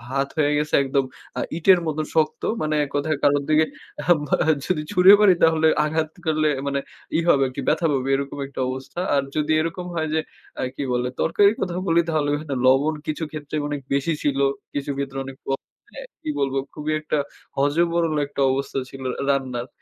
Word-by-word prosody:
ভাত 135 Hz, 0 st, +1 dB
হয়ে 145 Hz, -1 st, +3 dB
গেছে 150 Hz, 0 st, -2 dB
একদম 135 Hz, 0 st, +1 dB, 0.4 s
আ -, -, 0 dB, 0.2 s
ইটের 185 Hz, +2 st, +5 dB
মত 155 Hz, -, -2 dB, 0.2 s
শক্ত। 155 Hz, -1 st, +1 dB, 0.2 s
মানে 155 Hz, 0 st, 0 dB
এক 145 Hz, -, -5 dB
কথায় 150 Hz, +1 st, 0 dB
কারো 145 Hz, 0 st, +5 dB
দিকে 155 Hz, +1 st, +4 dB, 1.0 s
যদি 165 Hz, -4 st, 0 dB
ছুঁড়ে 180 Hz, +2 st, +7 dB
মারি 205 Hz, -3 st, +7 dB
তাহলে 160 Hz, -1 st, +4 dB, 0.2 s
আঘাত 155 Hz, 0 st, -1 dB, 0.2 s
করলে 155 Hz, -1 st, +2 dB, 0.2 s
মানে 140 Hz, 0 st, 0 dB, 0.4 s
ই -, -, +3 dB
হবে 135 Hz, -4 st, +5 dB
আরকি 130 Hz, +2 st, -5 dB
ব্যথা 170 Hz, -, +2 dB
পাবে 135 Hz, -1 st, -1 dB
এরকম 140 Hz, +1 st, -4 dB
একটা 140 Hz, -, -9 dB
অবস্থা। 130 Hz, +6 st, -6 dB, 0.2 s
আর 140 Hz, -, +2 dB
যদি 150 Hz, 0 st, 0 dB
এরকম 165 Hz, +2 st, -4 dB
হয় 160 Hz, -1 st, -1 dB
যে, 160 Hz, -, +2 dB, 0.4 s
আ -, -, 0 dB
কি 145 Hz, -, -3 dB
বলে 125 Hz, 0 st, 0 dB
তরকারির 200 Hz, +6 st, +4 dB
কথা 180 Hz, -2 st, -2 dB
বলি 165 Hz, 0 st, +4 dB
তাহলে 155 Hz, -2 st, +1 dB
কিন্তু 145 Hz, -3 st, -4 dB
লবণ 135 Hz, +4 st, +4 dB
কিছু 155 Hz, +1 st, -2 dB
ক্ষেত্রে 155 Hz, -1 st, -6 dB
অনেক 145 Hz, -1 st, -3 dB
বেশি 140 Hz, +4 st, +1 dB
ছিল 140 Hz, -2 st, +1 dB, 0.3 s
কিছু 145 Hz, 0 st, -2 dB
ক্ষেত্রে 135 Hz, -1 st, -4 dB
আনেক, 135 Hz, 0 st, -9 dB
ক -, -, -21 dB, 0.5 s
আ -, -, -6 dB, 0.2 s
কি -, -, -4 dB
বলবো 135 Hz, -1 st, 0 dB, 0.2 s
খুবই 150 Hz, +1 st, -3 dB
একটা 155 Hz, 0 st, -1 dB, 0.4 s
হজবরল 165 Hz, +3 st, +2 dB
একটা 140 Hz, 0 st, -5 dB
অবস্থা 135 Hz, +1 st, -2 dB
ছিল 135 Hz, -, -10 dB, 0.2 s
আ -, -, -1 dB
রান্নার। 130 Hz, -3 st, -1 dB
150 Hz, 190 wpm, -23 LUFS, 140-160 Hz, 1.0 s, ছুঁড়ে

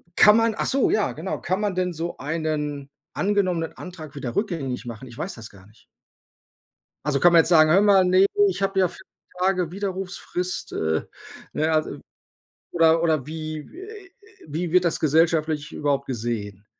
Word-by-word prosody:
kann 210 Hz, +2 st, +7 dB
man 225 Hz, -1 st, +2 dB
ach -, -, -1 dB
so, 270 Hz, -1 st, +2 dB
ja 215 Hz, -, +1 dB
genau. 165 Hz, +5 st, -4 dB
Kann 185 Hz, +3 st, -1 dB
man 205 Hz, -3 st, -1 dB
denn 180 Hz, -1 st, -1 dB
so 165 Hz, +2 st, -5 dB
einen 150 Hz, -2 st, -3 dB, 0.2 s
angenommenen 185 Hz, -5 st, 0 dB
Antrag 160 Hz, -5 st, -9 dB
wieder 125 Hz, -4 st, -5 dB
rückgängig 155 Hz, -, -2 dB
machen? 120 Hz, +2 st, -8 dB
Ich 120 Hz, -, -13 dB
weiß 195 Hz, -, -4 dB
das 115 Hz, -2 st, -9 dB
gar 95 Hz, -1 st, -17 dB
nicht. 110 Hz, -, -24 dB, 1.2 s
Also, 140 Hz, -2 st, 0 dB
kann 175 Hz, 0 st, +6 dB
man 165 Hz, -, +8 dB
jetzt -, -, +2 dB
sagen, 155 Hz, -2 st, +6 dB
hör 190 Hz, +5 st, +6 dB
mal, 195 Hz, -2 st, +5 dB
ne, 185 Hz, +2 st, +5 dB, 0.2 s
ich 375 Hz, -, -3 dB
habe 195 Hz, 0 st, 0 dB
ja 185 Hz, -, +3 dB
4 190 Hz, -, -13 dB, 0.4 s
Tage 185 Hz, -3 st, +1 dB
Widerrufsfrist. 185 Hz, -2 st, -4 dB
Äh, 80 Hz, 0 st, -1 dB, 0.5 s
ne? 155 Hz, +1 st, 0 dB
Also 155 Hz, -1 st, -1 dB, 0.7 s
oder 165 Hz, -1 st, +4 dB
oder 155 Hz, -6 st, +1 dB
wie 155 Hz, -1 st, -6 dB
w 330 Hz, -, -15 dB
äh 400 Hz, 0 st, -10 dB
äh, -, -, -25 dB, 0.4 s
wie 160 Hz, +3 st, -3 dB
wird 180 Hz, -1 st, +4 dB
das 165 Hz, -, +1 dB
gesellschaftlich 155 Hz, -1 st, +1 dB
überhaupt 140 Hz, -1 st, -1 dB
gesehen? 110 Hz, -5 st, -4 dB
165 Hz, 180 wpm, -23 LUFS, 145-185 Hz, 1.2 s, man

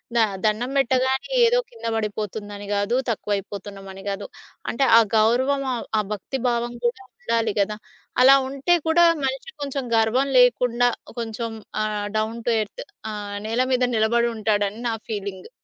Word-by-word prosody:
The -, -, +3 dB, 0.3 s
దండం 225 Hz, +5 st, +1 dB
పెట్టగానే 260 Hz, -, +1 dB, 0.2 s
ఏదో -, -, +4 dB
కింద 230 Hz, -1 st, -12 dB
పడిపోతుందని 205 Hz, -1 st, -4 dB
కాదు, 205 Hz, +4 st, 0 dB
తక్కువైపోతున్నామని 195 Hz, -2 st, -4 dB
కాదు. 195 Hz, -, -4 dB, 0.5 s
అంటే 270 Hz, +3 st, 0 dB
ఆ -, -, +10 dB, 0.2 s
గౌరవం, 260 Hz, +6 st, +3 dB
ఆహ్, 235 Hz, -, -4 dB
ఆ -, -, +3 dB
భక్తి 210 Hz, +6 st, -4 dB
భావం 240 Hz, 0 st, -1 dB
కూడా 255 Hz, +2 st, 0 dB, 0.2 s
ఉండాలి 230 Hz, -1 st, 0 dB
కదా! 210 Hz, +1 st, -1 dB, 0.4 s
అలా 270 Hz, +2 st, +9 dB
ఉంటే 275 Hz, +6 st, +1 dB
కూడా 345 Hz, +2 st, +5 dB, 0.2 s
మనిషికి 270 Hz, -, -4 dB
కొంచెం 275 Hz, -1 st, -3 dB
గర్వం 225 Hz, +5 st, +2 dB
లేకుండా, 245 Hz, 0 st, +4 dB, 0.3 s
కొంచెం 230 Hz, 0 st, -4 dB, 0.3 s
ఆహ్, 210 Hz, -1 st, -2 dB
డౌన్ 220 Hz, +2 st, -2 dB
టు -, -, +4 dB
ఎర్త్, 210 Hz, -, -6 dB, 0.3 s
ఆహ్, 205 Hz, -1 st, -5 dB
నేల 230 Hz, +3 st, +1 dB
మీద 250 Hz, 0 st, +2 dB
నిలబడుంటాడని 220 Hz, -2 st, +1 dB
నా 230 Hz, -, 0 dB, 0.2 s
ఫీలింగ్. 200 Hz, -, -5 dB
230 Hz, 140 wpm, -23 LUFS, 210-255 Hz, 0.5 s, ఆ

